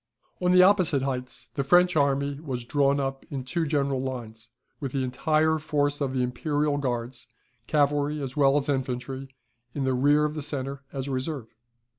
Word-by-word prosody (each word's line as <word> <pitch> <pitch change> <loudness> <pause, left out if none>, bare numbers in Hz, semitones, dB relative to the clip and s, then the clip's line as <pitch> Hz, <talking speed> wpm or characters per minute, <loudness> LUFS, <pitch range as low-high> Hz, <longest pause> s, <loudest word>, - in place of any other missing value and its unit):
] - - -41
On 180 0 +3
the 185 0 +7
opposite 185 -8 +4
heights 130 -2 -4
the 140 - -1
French 180 +5 +4
army 140 -1 +1
was 130 -6 -5
drawn 140 +1 +2
up 135 -1 -3
in 135 -2 -4
two 160 +5 -2
general 140 -3 0
lines, 115 -4 -6 0.3
with 135 -4 -4
the 135 -1 0
entire 155 +5 +1
force 145 -1 0
of 135 -2 0
the 130 -1 0
Imperial 145 +3 0
Guards, 120 -2 -3 0.4
cavalry 145 0 +1
as 135 -2 -5
well 140 -1 +4
as 145 0 -1
infantry, 135 0 -3 0.5
in 140 - -1 0.2
rear 145 +2 +4
of 150 - -2
the 155 - -4
centre, 140 -2 -4
as 135 -1 -4
a - - -3
reserve. 130 -2 -4
140 Hz, 180 wpm, -26 LUFS, 130-150 Hz, 0.5 s, the